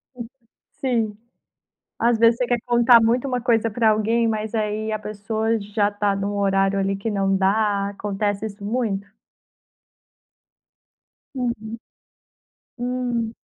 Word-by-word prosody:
Uhum. 235 -2 -7 0.5
Sim. 230 -5 0 0.8
Às 235 0 +2
vezes, 230 0 +5
você 250 -1 -1
quer 245 0 +1
contar 240 0 +6
muito 240 +4 +2
uma 250 -2 -1
coisa 230 -2 +1
para 220 0 +3
alguém, 225 +2 +1
mas, 220 0 -3
aí, 215 0 -1
a 215 - -1
pessoa 220 +2 -2
já 205 0 0
tá 205 -1 0
num 200 +1 -2
horário 195 0 +2
ali 195 0 0
que 215 +3 -3
não 195 -1 +1
dá. 200 +1 +1
Acontece 205 +1 -2
isso 200 -1 -9
muito? 205 -3 -2 2.3
Uhum, 230 -3 -4 1.0
Hum. 245 -2 -2
220 Hz, 130 wpm, -22 LUFS, 205-235 Hz, 2.3 s, contar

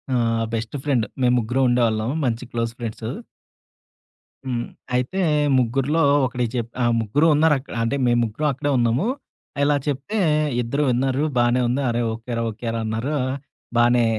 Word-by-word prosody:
ఆహ్, 115 -1 +1
best 115 +4 -3
friend. 130 -7 +1 0.2
మేం 125 0 +4
ముగ్గురం 125 +4 +1
ఉండేవాళ్ళం 115 -2 +1 0.2
మంచి 120 0 -1
క్లోజ్ 115 -1 -1
ఫ్రెండ్స్. 115 -1 -5 1.4
హ్మ్. 120 -2 -2 0.3
అయితే 125 +10 -1 0.4
ముగ్గురిలో 135 +6 +1 0.2
ఒకడికి 125 -2 -2
చె 120 - +1 0.2
ఆహ్, 120 0 +3
ముగ్గురు 130 +9 +1
ఉన్నారక్కడ. 150 -3 +2
అంటే 115 +5 0
మేం 120 0 +3
ముగ్గురం 115 +8 -2
అక్కడే 145 +3 -2
ఉన్నాము. 120 - +1 0.6
ఇలా 145 0 +3
చెప్తే 145 +10 -2 0.4
ఇద్దరు 140 +6 -1
విన్నారు. 130 +3 +1
బానే 120 +1 +3
ఉంది, 130 +4 0
"అరేయ్! 120 0 0
ఓకే 115 +2 -6
రా! 115 - 0
ఓకే 115 +2 -8
రా!" - - -1
అన్నారు. 115 +7 -2 0.6
బానే 120 0 +4
120 Hz, 150 wpm, -22 LUFS, 115-135 Hz, 1.4 s, మేం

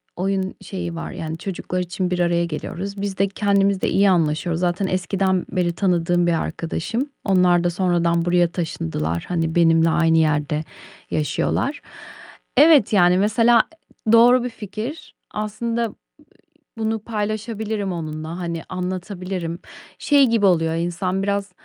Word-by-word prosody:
oyun 190 +1 -1
şeyi 175 -3 -5
var, 165 - -5
yani, 160 0 -5
çocuklar 185 0 -4
için 180 +1 -2
bir 180 - -1
araya 170 0 +2
geliyoruz. 195 +5 -5
Biz 200 -2 -3
de 195 +1 +2
kendimiz 200 -1 +1
de - - +1
iyi 200 0 +4
anlaşıyoruz. 165 0 +1
Zaten 180 +2 0
eskiden 185 0 0
beri 175 -2 0
tanıdığım 175 -2 +1
bir 165 -1 +1
arkadaşım. 225 - -3
Onlar 180 -3 +3
da 175 - +2
sonradan 170 -1 +1
buraya 175 0 +3
taşındılar. 85 - -3
Hani 165 -2 -1
benimle 165 -1 +4
aynı 165 0 +3
yerde 150 0 +1 0.5
yaşıyorlar. 155 - -1 0.8
Evet, 290 -8 +6
yani, 180 -2 +5
mesela, 230 +3 +4 0.4
e, - - +3
doğru 240 +2 +6
bir 250 - -2
fikir. 225 - -7 0.2
Aslında, 230 +3 -2
ııı, 225 - -4 0.8
bunu 220 0 -1
paylaşabilirim 215 -1 -3
onunla. 155 +1 -5
Hani 170 -2 -4
anlatabilirim. 185 -1 -4 0.4
Şey 280 -3 +4
gibi 225 -3 +2
oluyor 165 -3 +2
insan 175 +3 -2
biraz, 200 -1 -1
185 Hz, 140 wpm, -21 LUFS, 170-205 Hz, 0.8 s, Evet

